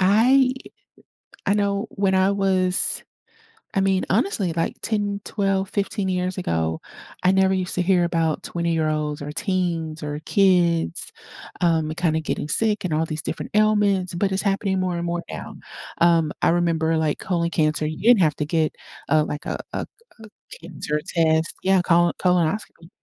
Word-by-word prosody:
I 250 +7 +4 0.9
I 200 - +3
know 200 +1 0
when 195 -2 0
I 190 +1 +3
was 185 -2 +2 0.7
I 195 - +3
mean, 190 -1 +1
honestly, 200 - +1
like, 165 0 -2
10, 205 -2 -1
12, 195 -2 -1
15 200 -1 -2
years 185 0 -2
ago, 80 - -1 0.4
I 185 - +5
never 190 0 +3
used 185 -1 -2
to 180 - +1
hear 180 -1 +3
about 165 -2 0
twenty-year-olds 155 -3 -1
or 145 +1 -5
teens 170 -4 -2
or 150 0 -4
kids, 175 - +2 0.5
um, 160 -3 +2
kinda 160 -3 +1
getting 150 - -3
sick 210 +3 +1
and 165 -4 -1
all 160 - +1
these 155 -1 -4
different - - -5
ailments, 205 -4 +2
but 195 +2 0
it's 190 - 0
happening 195 -1 0
more 180 -2 -1
and 170 - -3
more 175 0 -2
now. - - -7 0.5
Um, 165 -3 +4
I - - +4
remember, 165 -2 +1
like, 155 -2 0
colon 170 -2 -1
cancer, 155 -1 +1
you 155 0 -4
didn't 230 -2 +5
have 150 -2 +2
to 150 - -1
get, 160 -1 0 0.3
uh, 155 +1 +3
like, 150 - -6
a - - -3
a - - -3 0.4
a 220 - -12 0.3
cancer 150 0 -3
test. 160 -1 +1
Yeah, 190 -1 +4
colon 175 0 +3
colonoscopy 180 -1 0
180 Hz, 165 wpm, -23 LUFS, 160-195 Hz, 0.9 s, I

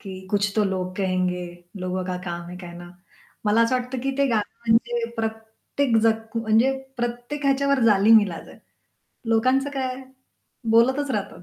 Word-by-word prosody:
की 190 -2 -8
कुछ 205 -1 +1
तो 210 - +3
लोग 185 -1 -2
कहेंगे 185 -2 0 0.4
लोगों 185 0 -2
का 180 0 -3
काम 170 -1 -5
है 180 -1 -9
ना. 175 0 -10 0.6
मला 220 +2 +4
असं 230 +3 +1
वाटतं, 250 +1 -5
की 270 +2 -1
ते 280 - +4
गाणं 215 -3 0 0.2
म्हणजे 235 +1 +2
प्रत्येक 225 +3 -2
जख 225 0 0
म्हणजे 225 +3 +3 0.2
प्रत्येक 240 +4 -4
ह्याच्यावर 275 0 +2
जालीम 215 +1 +6
ईलाज 185 -5 -5
आहे. - - -14 0.7
लोकांचं 255 +5 +2
काय 260 -2 -3 0.7
बोलतच 265 +5 +3
राहतात. 205 -5 -4
225 Hz, 150 wpm, -24 LUFS, 190-250 Hz, 0.7 s, जालीम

